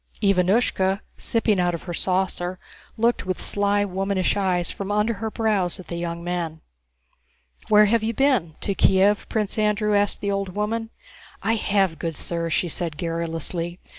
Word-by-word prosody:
Ivánushka, 195 0 +2
sipping 220 -4 +1
out 175 -1 +2
of 170 - -8
her 175 - -5
saucer, 185 0 -1 0.4
looked 230 -3 +1
with 185 - -2
sly 205 0 +1
womanish 195 0 0
eyes 185 -3 0
from 200 0 -5
under 210 +2 +2
her 220 +1 -4
brows 210 -5 0
at 185 - -11
the 170 - -3
young 170 0 -4
men. 170 -3 -3 1.1
"Where 210 0 +7
have 225 +2 +2
you 220 +1 0
been? 250 - +2
To 200 - -1
Kiev?" 195 +2 +3
Prince 215 -1 -1
Andrew 210 0 +2
asked 205 0 +2
the 200 - 0
old 195 -2 -2
woman. 225 +2 -1 0.5
"I 225 - +2
have, 195 -7 +1
good 165 -2 -3
sir," 170 +2 -3
she 165 - +1
answered 165 -2 -3
garrulously. 165 +1 -3
195 Hz, 165 wpm, -24 LUFS, 175-210 Hz, 1.1 s, Where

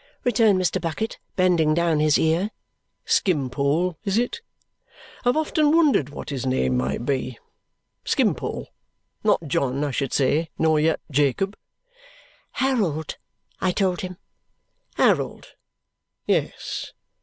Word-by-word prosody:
returned 220 -4 +4
Mr. 180 -3 0
Bucket, 175 +7 -3 0.2
bending 175 -5 +3
down 170 -2 +2
his 150 -1 +4
ear. 165 +6 +1 0.6
"Skimpole, 150 +1 +1
is 200 -1 0
it? 245 - -1 0.8
I've 245 +3 +2
often 310 -1 +2
wondered 300 - +3
what 145 - -7
his 135 -3 -3
name 95 - +1
might 65 - -1
be. 130 -3 -2 0.7
Skimpole. - - 0 0.5
Not - - +3
John, 135 0 0
I 145 - -1
should 135 0 -2
say, 150 +4 +1
nor 160 -1 +3
yet 160 +1 +1
Jacob?" 145 - +1 1.0
"Harold," 200 - 0 0.4
I 185 - +1
told 185 -1 0
him. 185 -1 -6 0.8
"Harold. - - +1 0.8
Yes. - - -2
160 Hz, 115 wpm, -24 LUFS, 140-195 Hz, 1.0 s, returned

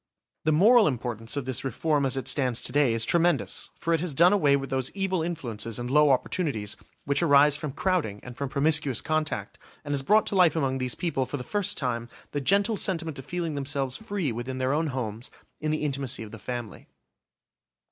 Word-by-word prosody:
The 155 - +3
moral 215 +9 +6
importance 120 -2 -3
of 140 - -2
this 130 -3 -2
reform 140 +2 0
as 135 +1 0
it 135 - -4
stands 130 -4 +1
to - - 0
day 140 -5 +3
is 115 - 0
tremendous, 170 0 +1
for 165 - 0
it 165 - +2
has 165 -4 -3
done 175 +6 +6
away 145 -9 +4
with 135 -1 -4
those 130 -1 0
evil 190 -3 0
influences 120 -10 -4
and 120 +1 -4
low 150 +1 +5
opportunities 130 - 0 0.3
which 140 0 +1
arise 145 -2 +5
from 145 -1 -4
crowding 155 - -1
and 125 -1 -9
from 140 0 -4
promiscuous 150 -2 +2
contact, 155 -10 -2 0.3
and 145 - -4
has 140 - +1
brought 210 +10 +3
to - - -2
life 180 -4 +5
among 135 -4 0
these 125 -1 -2
people, 135 -7 -1
for 145 - -4
the 125 - -6
first 205 +8 -1
time, 120 -3 -2 0.2
the 145 - -2
gentle 200 - +2
sentiment 165 -8 0
of 135 - -9
feeling 170 -3 -3
themselves 135 -2 -2
free 200 - -2
within 120 +3 -5
their 130 +1 0
own 160 +2 0
homes, 120 -4 -4 0.3
in 155 - -2
the 155 0 -1
intimacy 140 -4 -1
of 105 - -10
the 115 - -10
family. 120 -1 -6
140 Hz, 210 wpm, -26 LUFS, 125-165 Hz, 0.3 s, moral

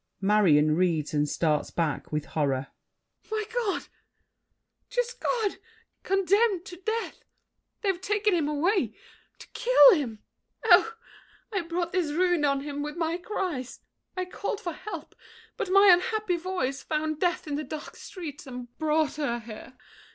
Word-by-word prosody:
MARION 175 -7 +4
(reads, 165 -4 +1
and 150 0 +1
starts 155 -2 0
back 160 -4 -2
with 150 -1 -2
horror). 135 -3 0 0.6
My 435 0 -1
God! 470 -5 -1 1.1
Just - - -2
God! 435 -5 0 0.4
Condemned 390 0 +2
to 355 -2 -9
death! 440 +5 -3 0.6
They've 385 -4 0
taken 410 +1 +1
him 325 -4 +1
away. 300 - +1 0.4
To - - -13
kill - - +7
him! 245 - -3 0.4
Oh, 450 +3 +6 0.6
I 390 - +1
brought 340 0 -3
this 360 -5 0
ruin 355 -1 +2
on 275 -1 +1
him 290 0 -5
with 300 +2 -5
my 330 0 0
cries! 350 - -4 0.4
I 370 - -1
called 405 +3 -4
for 350 -7 -4
help, 385 +6 -8 0.4
but - - -3
my 395 +1 +7
unhappy 430 0 +1
voice 330 -7 -2
Found 310 0 -2
death 350 +1 0
in 295 - -4
the 295 +2 -2
dark 305 0 -7
streets 310 -7 -8
and 245 -2 -8
brought 310 -1 +1
her 280 -6 -1
here. 230 +3 -11
330 Hz, 145 wpm, -27 LUFS, 255-390 Hz, 1.1 s, kill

